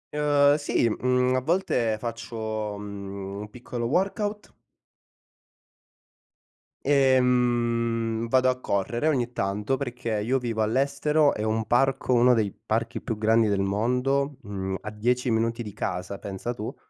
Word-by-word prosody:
Uhm, 145 -1 +4
sì. 145 -5 +1
Mhmm, 125 +2 +1
a 130 - +1
volte 130 - +1
faccio, 110 -2 -4
mhmm, 100 -1 -7
un 105 - -8
piccolo 120 +1 -5
workout. 205 - -1 2.3
Ehm, 120 -4 +2
vado 130 +2 +3
a 125 0 -1
correre 115 +5 -1
ogni 125 -6 +1
tanto, 105 +4 -1
perché 120 -5 -3
io 120 +6 +1
vivo 115 -3 -2
all'estero, 140 +5 +2
e 105 - -3
ho - - 0
un 110 0 0
parco, 135 +2 +2
uno 125 +1 +5
dei 110 -4 +1
parchi - - -1
più 110 - -4
grandi 110 +1 +3
del 100 -1 +1
mondo, 125 +8 0
mhmm, 95 -3 -4
a 105 - -6
10 125 +3 0
minuti 115 +1 0
di 105 - -7
casa, 95 -1 -4
pensa 100 +5 -4
tu. 110 -2 -6
120 Hz, 140 wpm, -26 LUFS, 105-130 Hz, 2.3 s, uno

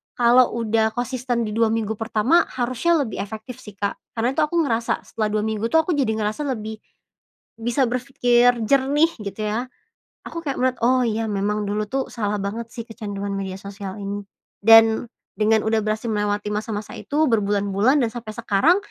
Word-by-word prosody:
kalau 245 +1 +5
udah 220 -1 +1
konsisten 245 -1 -1
di - - -4
2 230 0 +3
minggu 220 -1 -1
pertama 230 +9 +3
harusnya 255 +7 +1
lebih 220 - -6
efektif 220 +4 -8
sih, 210 - -12
Kak, 200 0 -2 0.2
karena 235 +2 +1
itu - - -1
aku 300 +3 -2
ngerasa 230 -6 -1
setelah 215 -2 -2
2 210 - +1
minggu 220 0 -1
tuh 320 0 +5
aku 355 - -2
jadi 265 -6 +1
ngerasa 215 +7 -2
lebih 220 -2 -5 0.8
bisa 240 +4 0
berpikir 245 -1 +2
jernih 280 +3 +4
gitu 200 0 -6
ya. 220 +4 -1 0.6
Aku 335 - -6
kayak 275 -3 -2
menurut 255 -1 +1
"Oh 255 +1 +4
iya 225 0 -1
memang 210 +1 -1
dulu 210 +1 -2
tuh 265 +3 -2
salah 210 -3 -1
banget 205 +3 -4
sih 230 -1 -7
kecanduan 205 -3 -5
media 195 -1 -4
sosial 195 0 -8
ini." 200 0 -4 0.4
Dan 225 +2 +6 0.3
dengan 220 0 +3
udah 220 0 +2
berhasil 215 +2 -2
melewati 210 0 -1
masa-masa 215 0 -4
itu 300 +2 0
berbulan-bulan 205 +4 +2
dan 230 - -1
sampai 225 -3 -7
sekarang, 235 - +3
225 Hz, 175 wpm, -22 LUFS, 210-245 Hz, 0.8 s, Dan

